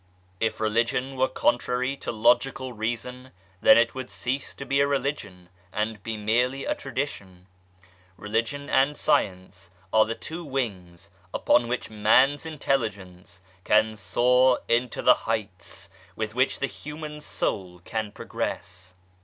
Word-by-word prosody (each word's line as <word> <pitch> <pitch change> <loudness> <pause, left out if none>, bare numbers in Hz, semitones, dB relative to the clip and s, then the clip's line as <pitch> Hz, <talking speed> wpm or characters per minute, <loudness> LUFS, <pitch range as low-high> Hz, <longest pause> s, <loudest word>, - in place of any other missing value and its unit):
If 110 - 0
Religion 115 +4 0
were 130 0 +2
contrary 125 +2 0
to - - -4
logical 125 +3 +2
Reason 120 +3 -4 0.3
then - - +8
it 115 0 +3
would 130 -1 -6
cease 130 +3 -3
to 140 - -7
be 140 0 +1
a 140 - +3
Religion 135 -10 -3 0.2
and 105 +1 -2
be 110 +1 -4
merely 125 +6 +1
a - - +1
tradition. 115 -9 -5 0.7
Religion 115 +8 -2
and 135 +2 +2
Science 90 -1 0 0.2
are 110 0 +6
the 115 - -3
two 165 +7 -7
wings 95 - -4 0.2
upon 120 -1 +3
which 125 -1 -3
man's 135 +8 +3
intelligence 100 - -3 0.2
can 110 +2 +3
soar 125 +6 +3
into 120 +1 0
the - - +8 0.2
heights, 100 -3 -4 0.2
with 110 -1 -3
which 130 +2 +2
the - - 0
human 150 +1 -7
soul 90 -10 -3
can 110 -2 -3
progress. 90 -1 -5
115 Hz, 135 wpm, -26 LUFS, 105-130 Hz, 0.7 s, then